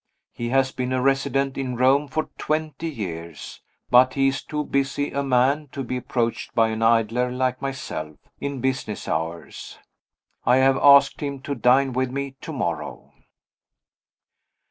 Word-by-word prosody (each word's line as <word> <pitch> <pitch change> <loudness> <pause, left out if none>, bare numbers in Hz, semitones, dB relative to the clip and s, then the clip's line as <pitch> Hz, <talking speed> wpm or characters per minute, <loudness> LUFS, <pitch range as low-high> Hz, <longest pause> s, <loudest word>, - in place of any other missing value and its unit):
He 120 0 -4
has 130 +1 +2
been 130 0 -3
a 130 - +1
resident 135 0 0
in 130 -2 -3
Rome 135 +4 +3
for 155 +4 -3
twenty 155 +1 -2
years 85 - -7 0.3
but 125 +1 +6
he 135 -1 +3
is 135 - -3
too 150 0 -3
busy 140 0 -1
a 140 - -1
man 135 +3 +2
to 135 - -4
be 125 +1 -3
approached, 120 -2 -2
by 115 -1 +4
an 110 0 -3
idler 115 +2 +2
like 130 0 -1
myself, 105 - -5 0.2
in 140 -2 -4
business 130 -5 -2
hours. 80 +2 -4 0.7
I 125 - +4
have 135 0 +4
asked 140 -1 +6
him 140 -2 -3
to 140 - -4
dine 130 +1 +3
with 130 +1 0
me 140 +1 -4
to - - -7
morrow. - - -4
130 Hz, 155 wpm, -23 LUFS, 125-140 Hz, 0.7 s, but